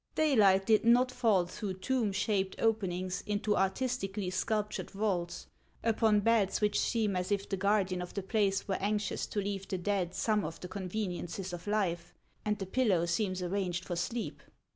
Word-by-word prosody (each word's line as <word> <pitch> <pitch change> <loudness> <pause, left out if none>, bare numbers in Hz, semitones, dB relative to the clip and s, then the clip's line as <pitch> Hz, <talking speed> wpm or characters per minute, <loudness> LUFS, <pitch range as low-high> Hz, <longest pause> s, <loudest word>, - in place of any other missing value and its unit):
Daylight 205 -11 +4
did 220 0 +4
not 245 +2 +5
fall 220 -8 +3
through 190 +2 -5
tomb 230 +2 0
shaped 195 -1 0
openings, 185 -4 0
into 210 0 0
artistically 195 -2 -1
sculptured 210 +2 -1
vaults, 195 -4 -2 0.4
upon 220 -2 +3
beds 220 -3 +2
which 210 -1 +2
seern 215 -4 +1
as 180 +2 -2
if 200 -1 0
the 195 - -1
guardian 195 -2 +1
of 180 - -7
the 200 - -2
place 195 0 +1
were 195 - -1
anxious 210 +1 -1
to 210 - -2
leave 195 -1 -3
the 190 - -2
dead 185 -1 -1
some 215 -2 +1
of 165 +1 -5
the 180 - -7
conveniences 185 -1 -4
of 175 +3 -7
life, 180 -5 -1 0.3
and 210 0 0
the 195 - -4
pillow 190 -5 +2
seems 185 +1 -1
arranged 180 -1 -2
for 175 - -3
sleep. 230 +7 -3
200 Hz, 170 wpm, -32 LUFS, 185-215 Hz, 0.4 s, not